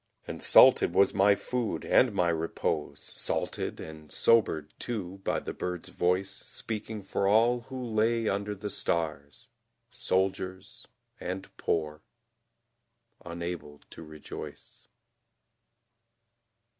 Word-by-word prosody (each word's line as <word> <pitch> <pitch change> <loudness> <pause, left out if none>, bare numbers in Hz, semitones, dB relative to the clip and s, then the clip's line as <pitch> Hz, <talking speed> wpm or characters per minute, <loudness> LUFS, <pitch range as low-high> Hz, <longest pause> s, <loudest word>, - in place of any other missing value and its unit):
And - - -6
salted - - +6
was 100 - +5
my 100 +1 +5
food, 120 +2 -3
and 125 - +4
my 90 -4 +1
repose, 80 -2 -2
Salted - - -2
and 80 -1 -10
sobered, 80 -10 +2
too, 100 -5 -4
by - - 0
the - - -6
bird's 90 -2 -4
voice 90 +2 +1
Speaking 110 -1 -5
for 95 +1 -1
all 115 +4 +4
who 130 -1 -5
lay 115 0 +1
under 100 +1 -1
the 100 +1 -5
stars, 75 -6 -2 0.4
Soldiers 95 0 -2 0.3
and 95 +2 -6
poor, 75 -2 -1 1.2
unable 85 -3 -6
to - - -10
rejoice. 75 -1 -10
95 Hz, 105 wpm, -29 LUFS, 80-105 Hz, 1.2 s, salted